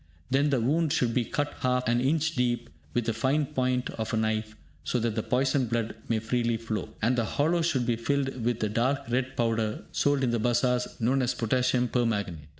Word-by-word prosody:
Then 140 +3 +3
the 135 -3 +2
wound 150 +6 +1
should 120 -4 +1
be 125 - +2
cut 145 +4 -2
half 125 -1 +1
an 120 +1 +2
inch 155 +4 +1
deep 120 - 0 0.2
with 120 -2 +1
the 115 - 0
fine 135 +7 +1
point 130 -3 -1
of 110 -1 -4
a - - +1
knife, 110 0 -1 0.3
so 125 - 0
that 115 -1 0
the 110 - -1
poisoned 130 +2 +1
blood 115 -1 -1 0.2
may 115 - +2
freely 115 +1 0
flow, 115 -1 -4
and 120 +3 +3
the 120 - +1
hollow 160 +9 +1
should 145 -7 +1
be 120 -1 +1
filled 135 0 -1
with 120 0 0
the 105 - +1
dark 130 +6 +1
red 130 +2 -1
powder 115 -2 0
sold 145 -1 +1
in 125 - +2
the 120 - 0
bazaars 125 +2 +2
and - - -16
known 130 +4 +2
as 125 -1 0
Potassium 125 +1 +1
Permanganate. 100 - -1
125 Hz, 215 wpm, -28 LUFS, 115-135 Hz, 0.3 s, Then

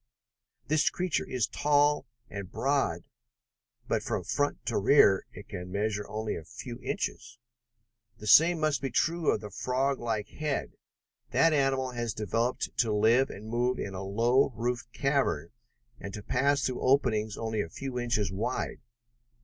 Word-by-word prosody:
This 155 0 +3
creature 180 -3 -1
is 125 -4 +1
tall 145 +3 +2 0.2
and 100 -3 -7
broad, 135 - 0 0.9
but - - 0
from - - -2
front 145 0 -1
to 115 - 0
rear 100 -3 +5
it 100 - -11
can 90 -2 -6
measure 105 +1 -1
only 110 0 -3
a 80 - -6
few - - -8
inches. 115 - -4 0.8
The 105 - -10
same 165 - +6
must 155 -4 +1
be 135 - -2
true 165 +3 +1
of 105 - +1
the 105 -2 -8
froglike 125 -2 -1
head. 150 -2 -3 0.6
That 165 -1 +4
animal 135 -2 +1
has 120 -3 -3
been 110 - -4
developed 115 +5 -1
to 115 -3 +3
live 115 +5 +4
and 105 +3 -9
move 120 +2 0
in 100 - -4
a 95 - -5
low 115 +8 +2
roofed 120 +2 -3
cavern, 135 - 0 0.5
and 100 - -7
to 105 - -8
pass 140 +5 +1
through 130 - -2
openings 115 -6 +2
only 110 -2 -1
a 85 - -5
few 130 +5 -5
inches 115 -6 0
wide. 110 +6 -3
120 Hz, 155 wpm, -29 LUFS, 105-140 Hz, 0.9 s, same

